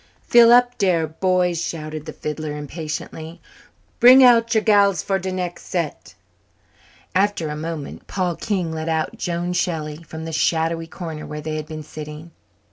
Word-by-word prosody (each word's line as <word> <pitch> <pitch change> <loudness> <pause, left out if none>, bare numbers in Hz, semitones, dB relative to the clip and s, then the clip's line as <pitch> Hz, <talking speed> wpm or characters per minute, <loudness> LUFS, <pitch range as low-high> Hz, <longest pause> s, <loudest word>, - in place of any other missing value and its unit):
"Fill 235 -1 +6
up 245 0 +5
dere, 180 -5 +2
boys," 180 +1 0
shouted 155 -1 -5
the - - -4
fiddler 150 0 -5
impatiently. 155 +2 -6 0.6
"Bring 255 +2 +9
out 230 -2 +5
your 220 - +3
gals 200 -5 +4
for 195 -1 0
de 190 +1 -4
nex' 180 -1 -4
set." 170 -5 -4 1.0
After 190 -4 +1
a 150 - -4
moment 155 -1 -6
Paul 180 -3 -1
King 185 -4 -2
led 160 0 -4
out 160 -1 -1
Joan 175 +1 -2
Shelley 160 -4 -2
from 160 0 -8
the 165 - -6
shadowy 165 +1 0
corner 160 -3 -7
where 150 - -6
they 155 +1 -4
had 155 -1 -5
been 155 -1 -7
sitting. 155 +2 -9
165 Hz, 160 wpm, -21 LUFS, 155-185 Hz, 1.0 s, Bring